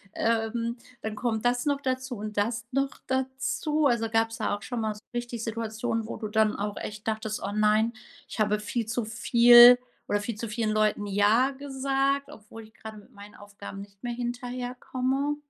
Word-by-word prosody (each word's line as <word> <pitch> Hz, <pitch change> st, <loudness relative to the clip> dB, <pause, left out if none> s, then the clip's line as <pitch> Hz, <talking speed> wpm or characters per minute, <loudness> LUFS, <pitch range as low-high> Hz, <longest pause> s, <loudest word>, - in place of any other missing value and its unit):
ähm, 230 Hz, +1 st, 0 dB, 0.3 s
dann 220 Hz, -1 st, -4 dB
kommt 220 Hz, 0 st, -2 dB
das 245 Hz, 0 st, +1 dB
noch 285 Hz, -1 st, +1 dB
dazu 260 Hz, -3 st, -3 dB
und 215 Hz, 0 st, -6 dB
das 225 Hz, +2 st, -1 dB
noch 275 Hz, +1 st, 0 dB, 0.2 s
dazu. 265 Hz, +4 st, -1 dB
Also, 230 Hz, -2 st, +1 dB
gab's 225 Hz, 0 st, +1 dB
da 210 Hz, -1 st, 0 dB
auch -, -, -18 dB
schon 245 Hz, -2 st, -4 dB
mal 215 Hz, -1 st, -1 dB
so 210 Hz, -, -13 dB
richtig 240 Hz, -1 st, -4 dB
Situationen, 225 Hz, 0 st, -3 dB
wo -, -, -6 dB
du 215 Hz, -, -4 dB
dann 215 Hz, 0 st, +2 dB
auch 205 Hz, 0 st, -3 dB
echt 210 Hz, +1 st, -7 dB
dachtest: 220 Hz, -1 st, -2 dB
„Oh 195 Hz, -, -3 dB
nein, 215 Hz, +2 st, +3 dB, 0.3 s
ich -, -, -8 dB
habe 210 Hz, 0 st, +2 dB
viel 225 Hz, +2 st, -3 dB
zu 230 Hz, 0 st, -2 dB
viel 240 Hz, +2 st, +8 dB, 0.3 s
oder 205 Hz, -, 0 dB
viel 225 Hz, +2 st, -4 dB
zu 230 Hz, +2 st, -5 dB
vielen 215 Hz, 0 st, -1 dB
Leuten 215 Hz, -1 st, +1 dB
„ja“ 205 Hz, +6 st, +3 dB
gesagt, 275 Hz, 0 st, -1 dB
obwohl 220 Hz, +1 st, -12 dB
ich 220 Hz, 0 st, -17 dB
grad 220 Hz, -1 st, -10 dB
mit 205 Hz, -, -16 dB
meinen 205 Hz, 0 st, -13 dB
Aufgaben 200 Hz, -1 st, -10 dB
nicht 200 Hz, 0 st, -14 dB
mehr 240 Hz, -1 st, -2 dB
hinterherkomme? 250 Hz, +3 st, -2 dB
230 Hz, 185 wpm, -27 LUFS, 215-250 Hz, 0.3 s, viel